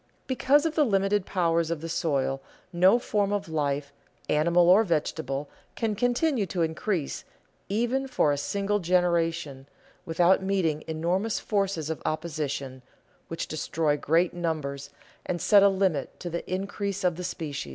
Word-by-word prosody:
Because 275 +3 +3
of 325 - 0
the 305 - +3
limited 195 -4 +1
powers 170 -3 +1
of 170 -2 -2
the 165 - -6
soil, 135 -5 -1 0.3
no 185 +6 +5
form 205 -4 0
of 205 -2 -1
life, 145 -2 -2 0.4
animal 170 +3 +3
or 190 +5 +7
vegetable, 150 -5 -2 0.3
can 225 -2 -1
continue 245 +1 +1
to 175 0 -1
increase 160 0 -2 0.5
even 240 +6 0
for 245 - +2
a 145 - 0
single 200 +6 -1
generation, 170 -6 0 0.4
without 175 +2 +3
meeting 185 -6 0
enormous 175 +7 -1
forces 195 -7 -1
of 160 - -5
opposition, 150 -4 -3 0.5
which 165 - -4
destroy 155 -1 0
great 165 +4 +1
numbers 150 -5 -3 0.3
and 175 - -3
set 200 +4 +5
a 200 - +6
limit 190 -7 -1
to 175 - -5
the 170 +1 -5
increase 200 +1 -3
of 180 -2 +2
the 180 - -6
species. 150 - -5
175 Hz, 150 wpm, -27 LUFS, 155-200 Hz, 0.5 s, or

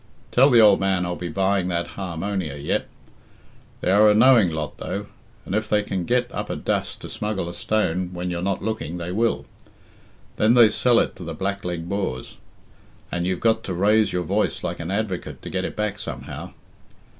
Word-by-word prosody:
Tell 135 +3 +6
the 120 -3 +6
old 105 -3 +7
man 95 -2 +1
I'll 90 0 -2
be 90 - -5
buying 95 -1 +1
that 85 -1 -2
har 90 -4 -6
monia 90 -5 -3
yet. 70 - -1 0.9
They 90 - +1
are 105 +2 +6
a 105 - +4
knowing 115 -4 +6
lot, 80 -2 -5
though, - - -4 0.4
and - - -5
if 110 +1 -1
they 105 -1 +2
can 95 -3 -3
get 125 +2 +1
up - - -4
a - - -2
dust - - -2
to - - -7
smuggle 105 -4 -3
a 85 - -6
stone 95 -4 0
when 90 0 -4
you're 85 0 -3
not 95 +1 -1
looking, 110 -6 -3
they 85 0 -5
will. 115 +4 0 0.9
Then 110 +3 +4
they 120 -3 +8
sell 120 +2 +3
it - - +1
to 90 - -8
the 85 -1 -5
blackleg 90 -3 -3
Boers, 95 -10 -3 0.7
and 85 0 -1
you've 90 -1 -1
got 110 -1 +2
to 95 - -3
raise 105 +4 +3
your 90 - -1
voice 80 - -1
like - - -3
an 85 0 -5
advocate 100 -2 -3
to - - -7
get 95 0 -1
it - - -5
back 105 -1 -2
somehow. - - -7
95 Hz, 200 wpm, -23 LUFS, 90-110 Hz, 0.9 s, they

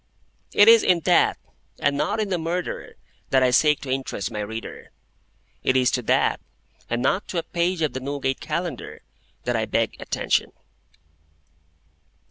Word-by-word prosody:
It 205 - +6
is 230 -1 +8
in 175 -2 +3
that, - - +3 0.4
and 145 0 +1
not 180 - -1
in 210 -2 -1
the 180 -2 0
Murderer, 170 +2 -4 0.3
that 130 -1 +3
I 125 - +3
seek 150 +3 +3
to 135 - -5
interest 130 -6 -3
my 105 - -4
reader. 110 +2 -6 0.7
It 130 - +2
is 125 -1 +3
to 125 - 0
that, - - +2 0.5
and 120 +1 -1
not 195 +9 +1
to 180 - -4
a 165 - 0
page 170 0 -1
of 155 - 0
the 130 - -3
Newgate 135 0 -2
Calendar, 170 -7 -5 0.4
that - - -1
I - - 0
beg - - 0
attention. - - -1
145 Hz, 160 wpm, -24 LUFS, 130-175 Hz, 0.7 s, is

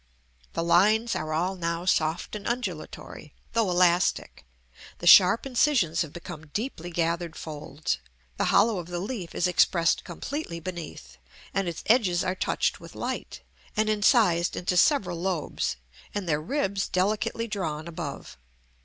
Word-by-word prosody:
The 165 - -1
lines 215 +7 +3
are 155 0 -3
all 175 +5 0
now 170 -1 -3
soft 165 +1 0
and 205 - -6
undulatory, 185 - -5 0.2
though 225 -4 +2
elastic; 175 - +2 0.5
the - - -8
sharp 185 +6 +7
incisions 245 - +2
have 160 -4 -3
become 155 -2 -9
deeply 175 - -4
gathered 170 0 -1
folds; 150 -1 -4 0.4
the - - +1
hollow 220 -4 +3
of 170 - -7
the 175 0 -4
leaf 195 -3 -5
is - - +1
expressed 175 -2 +3
completely 185 - -5
beneath, 160 - -8 0.3
and 195 -2 0
its 170 -1 -5
edges 205 -7 +3
are 185 - 0
touched 185 - -1
with - - -12
light, - - -5 0.4
and 215 0 +2
incised 205 -5 +3
into 180 +1 -1
several 180 - +3
lobes, 175 - -1 0.4
and 200 -3 -3
their 150 -2 +1
ribs 195 - -1
delicately 210 +4 0
drawn 165 -7 -3
above. 165 - -7
180 Hz, 145 wpm, -27 LUFS, 165-205 Hz, 0.5 s, sharp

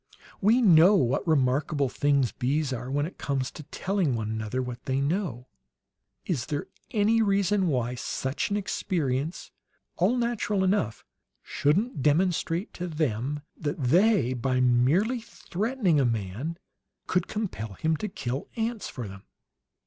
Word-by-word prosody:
"We 225 +5 +4
know 180 0 +7
what 135 -2 +1
remarkable 140 -1 +2
things 140 -1 +1
bees 140 +2 -1
are, 125 +1 -5
when 145 +2 0
it 175 - -9
comes 135 -2 -1
to - - -9
telling 170 -1 -1
one 110 -1 -3
another 110 +3 -3
what 125 -1 -5
they 130 0 0
know. 145 - -1 0.8
Is 130 -9 -2
there 145 0 -2 0.2
any 220 +1 +3
reason 200 -2 +2
why 125 -5 0
such 130 - -2
an 205 - 0
experience 160 -6 -2 0.5
all 200 +9 +2
natural 235 -5 0
enough 185 - 0 0.4
shouldn't 160 - 0
demonstrate 170 - +1
to 180 - -4
them 145 -3 -2
that 145 -2 -3
they, 160 - +3
by 130 +1 0
merely 135 - +3
threatening 215 - -1
a - - +3
man, 115 - -2 0.5
could 180 -1 0
compel 115 - -4
him 160 +10 0
to 215 - -3
kill 135 -8 -4
ants 225 -1 -2
for 125 -5 -6
them?" 95 0 -11
150 Hz, 140 wpm, -27 LUFS, 125-195 Hz, 0.8 s, know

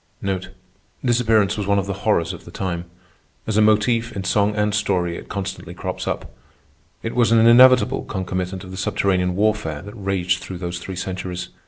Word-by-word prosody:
Disappearance 110 -4 +2
was 100 - -2
one 100 0 +3
of 100 - 0
the 100 - -3
horrors 95 -5 +1
of 90 - -10
the - - -12
time. 85 -1 -4 0.6
As 110 - -2
a 110 - +5
motif, 115 +2 +3
in 100 - -3
song 105 +1 +1
and 105 0 +1
story, 90 -5 0
it - - -9
constantly 95 -2 -5
crops - - -5
up. - - -4 0.7
It 115 - -3
was 120 -2 +3
an 115 -1 +5
inevitable 125 +2 +6
concomitant 95 -1 -3
of 95 - -10
the 95 - -7
subterranean 90 -1 0
warfare 105 -7 0
that 100 +1 -9
raged 95 -3 -1
through 95 - -7
those 85 0 -4
three 95 +1 -7
centuries. 90 0 -4
100 Hz, 180 wpm, -21 LUFS, 90-110 Hz, 0.7 s, inevitable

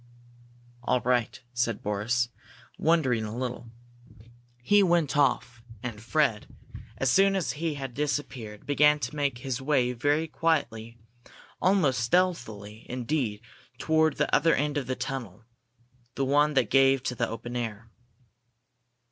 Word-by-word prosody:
"All 125 +1 +1
right," 125 -1 0
said 120 -3 -1
Boris, 115 +4 0 0.5
wondering 140 -9 +2
a 110 +2 -5
little. 125 -2 -4 0.9
He 205 +9 +5
went 170 -6 +2
off, 125 -4 +1 0.2
and 115 -4 -5
Fred, 120 -3 0 0.5
as 135 -1 +1
soon 195 0 +4
as 190 -4 -1
he 155 0 -3
had 135 -3 -6
disappeared, 130 -6 -4
began 150 +1 +4
to 130 -1 -5
make 140 -4 -1
his 130 0 -4
way 130 -3 +1
very 145 +5 +1
quietly, 130 -7 -1 0.6
almost 180 -10 +3
stealthily, 115 - -1
indeed, 125 -3 -2 0.4
toward 160 -2 +2
the - - +2
other 165 +3 +4
end 145 +1 -1
of 145 -3 -2
the 130 - -1
tunnel 115 -7 -6 0.7
the 135 - 0
one 145 +2 +3
that 130 -5 +2
gave 135 -1 +4
to 125 - -2
the 125 - -1
open 120 +2 -6
air. 115 -2 -4
130 Hz, 135 wpm, -27 LUFS, 120-150 Hz, 0.9 s, He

